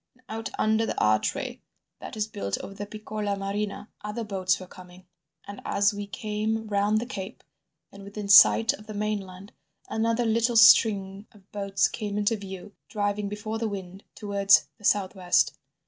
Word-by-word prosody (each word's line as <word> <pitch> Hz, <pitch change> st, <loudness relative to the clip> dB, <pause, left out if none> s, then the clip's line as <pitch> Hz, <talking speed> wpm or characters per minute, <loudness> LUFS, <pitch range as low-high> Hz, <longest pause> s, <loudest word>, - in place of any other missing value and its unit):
And 255 Hz, -, -28 dB
out 225 Hz, 0 st, -4 dB
under 220 Hz, +1 st, +2 dB
the -, -, -3 dB
archway 110 Hz, 0 st, 0 dB, 0.4 s
that -, -, -8 dB
is 210 Hz, -, 0 dB
built 100 Hz, -, -4 dB
over 195 Hz, -, -8 dB
the 205 Hz, +1 st, -7 dB
Piccola 215 Hz, -1 st, -4 dB
Marina 200 Hz, +1 st, -4 dB, 0.2 s
other 210 Hz, +2 st, -4 dB
boats 190 Hz, -3 st, 0 dB
were 185 Hz, -, -8 dB
coming; 180 Hz, 0 st, -15 dB, 0.4 s
and 200 Hz, 0 st, -9 dB
as 200 Hz, +1 st, +2 dB
we 205 Hz, 0 st, -6 dB
came 215 Hz, +2 st, -3 dB
round 205 Hz, 0 st, +1 dB
the 235 Hz, -, -4 dB
cape 220 Hz, -3 st, -7 dB, 0.5 s
and 200 Hz, -, -12 dB
within 200 Hz, +1 st, -7 dB
sight 220 Hz, +2 st, +7 dB
of 210 Hz, -, -12 dB
the 215 Hz, -, -7 dB
mainland, 200 Hz, -2 st, -4 dB, 0.4 s
another 230 Hz, +2 st, 0 dB
little 230 Hz, +1 st, +2 dB
string 200 Hz, -2 st, +5 dB
of 200 Hz, -2 st, -22 dB
boats 200 Hz, -1 st, +1 dB
came 210 Hz, -2 st, -5 dB
into 210 Hz, +2 st, +1 dB
view, 195 Hz, -1 st, -9 dB, 0.2 s
driving 205 Hz, -1 st, -2 dB
before 215 Hz, +2 st, -5 dB
the 225 Hz, -1 st, -1 dB
wind 190 Hz, -1 st, -8 dB
towards 200 Hz, -1 st, +3 dB
the -, -, -19 dB
south 195 Hz, -2 st, +2 dB
west. 180 Hz, -3 st, +2 dB
205 Hz, 170 wpm, -26 LUFS, 195-215 Hz, 0.5 s, sight